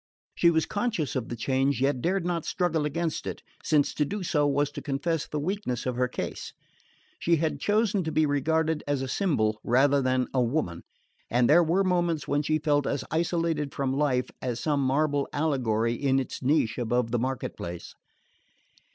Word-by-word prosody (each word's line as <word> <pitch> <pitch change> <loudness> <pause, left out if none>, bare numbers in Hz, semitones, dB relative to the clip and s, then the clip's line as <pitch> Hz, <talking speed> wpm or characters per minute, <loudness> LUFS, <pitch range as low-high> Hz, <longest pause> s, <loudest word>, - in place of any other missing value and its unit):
She 170 - +4
was 160 -1 +2
conscious 205 - -2
of 125 -3 -2
the 120 - -3
change, 135 +2 0
yet 135 -1 +1
dared 185 +3 0
not 170 -2 -1
struggle 165 -5 0
against 160 +2 -2
it, - - -6 0.2
since 150 -3 +2
to 150 - +1
do 195 +6 -4
so 150 -4 +2
was 145 +1 +1
to - - -7
confess 150 +3 -2
the 150 - -3
weakness 170 - -2
of 125 -1 -1
her 125 +1 +1
case. 125 - -5 0.7
She 170 - +3
had 160 0 -1
chosen 210 -2 +1
to 160 - -2
be 155 0 +3
regarded 155 +2 0
as 145 -2 0
a - - -3
symbol 120 - 0
rather 135 +3 +3
than 130 -1 +1
a 130 - +2
woman, 120 - -1 0.5
and 120 0 +3
there 170 +4 +6
were 175 +4 +2
moments 175 -4 0
when 145 +1 +1
she 155 +1 +1
felt 145 -2 +1
as 140 - -1
isolated 165 -2 -1
from 135 -1 -1
life 135 -3 0
as 125 -2 -2
some 145 -2 0
marble 145 +1 +1
allegory 120 -7 +1
in 135 +2 +1
its 130 - -5
niche 130 -5 +1
above 120 0 0
the 120 - +1
market 130 0 -3
place. 85 0 -7
145 Hz, 185 wpm, -27 LUFS, 130-160 Hz, 0.7 s, there